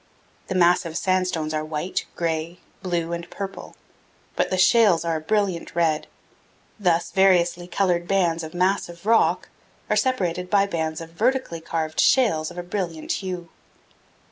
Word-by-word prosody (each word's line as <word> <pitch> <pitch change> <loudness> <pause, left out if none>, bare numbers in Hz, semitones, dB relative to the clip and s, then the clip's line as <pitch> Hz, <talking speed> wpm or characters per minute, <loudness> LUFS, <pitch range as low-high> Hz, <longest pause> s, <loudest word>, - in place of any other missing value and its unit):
The 190 - -3
massive 175 -2 +3
sandstones 185 -4 0
are 155 0 -1
white, 155 +4 -3
gray, 165 0 -2 0.2
blue, 170 -2 -2
and 170 0 -5
purple, 195 -1 -7 0.6
but - - +1
the 185 - -1
shales 190 -3 +4
are 165 -1 0
a - - -6
brilliant 190 -1 -1
red; 160 -3 +1 0.7
thus 175 -4 +1
variously 175 -2 +3
colored 175 -1 0
bands 175 -4 +1
of 160 +1 -8
massive 180 -1 -1
rock 225 +1 +3 0.4
are - - +4
separated 180 -9 0
by 200 0 +4
bands 160 -4 -3
of 165 0 -9
vertically 225 -3 -1
carved 160 -1 -3
shales 205 -12 +3
of - - -12
a 175 - -4
brilliant 175 -4 -4
hue. 180 -3 -5
175 Hz, 145 wpm, -23 LUFS, 165-190 Hz, 0.7 s, shales